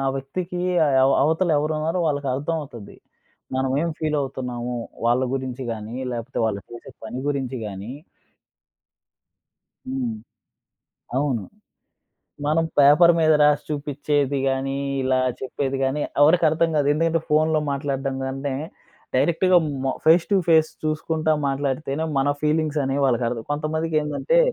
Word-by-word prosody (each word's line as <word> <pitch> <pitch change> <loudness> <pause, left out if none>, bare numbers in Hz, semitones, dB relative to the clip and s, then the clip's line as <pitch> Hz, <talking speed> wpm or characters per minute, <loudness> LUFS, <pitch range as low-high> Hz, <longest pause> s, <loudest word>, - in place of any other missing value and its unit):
వ్యక్తికి 175 +7 -4 0.4
అవ 135 - +4
అవతల 160 +4 +1
ఎవరున్నారో 155 +3 -1
వాళ్ళకి 145 -2 -1
అర్థం 145 +5 -2
అవుతది. 120 -8 -10 0.6
మనం 130 0 0
ఏం 170 - 0
ఫీల్ 155 -1 0
అవుతున్నాము? 125 -2 -4 0.3
వాళ్ళ 120 +2 +3
గురించి 130 0 -4
గాని, 110 +2 -6 0.2
లేపోతే 120 +3 -6
వాళ్ళు 100 -2 -2
చేసే 120 +3 -10
పని 120 +3 -5
గురించి 135 -3 -2
గాని 100 +3 -7 2.0
హ్మ్. 130 -3 -2 1.0
అవును. 135 -7 0 1.0
మనం 160 +2 +2
పేపర్ 150 +5 +7
మీద 155 -1 +4
రాసి 150 -1 +4
చూపించేది 145 -1 -1
గానీ 135 +1 -1 0.3
ఇలా 130 0 +2 0.2
చెప్పేది 135 +1 -3
గాని 135 +3 0 0.2
ఎవరికీ 165 +4 +5
అర్థం 165 +2 +1
కాదు. 145 -2 +2
ఎందుకంటే 165 +1 +1
ఫోన్‌లో 155 +1 +3
మాట్లాడడం 135 -1 -2
కంటే, 135 +1 -3 0.6
డైరెక్ట్‌గా 175 +6 +3 0.3
మ 130 - +1
ఫేస్ 165 +2 +6
టు 200 - +5
ఫేస్ 160 -1 +5
చూసుకుంటా 155 +1 0
మాట్లాడితేనే 140 +2 -2
మన 135 +1 +2
ఫీలింగ్స్ 155 0 +1
అనేవి 135 +1 0
వాళ్ళకి 125 -2 +1
అర్థం 115 -2 -5
కొంతమందికేందంటే, 155 - 0
145 Hz, 125 wpm, -23 LUFS, 130-155 Hz, 2.0 s, పేపర్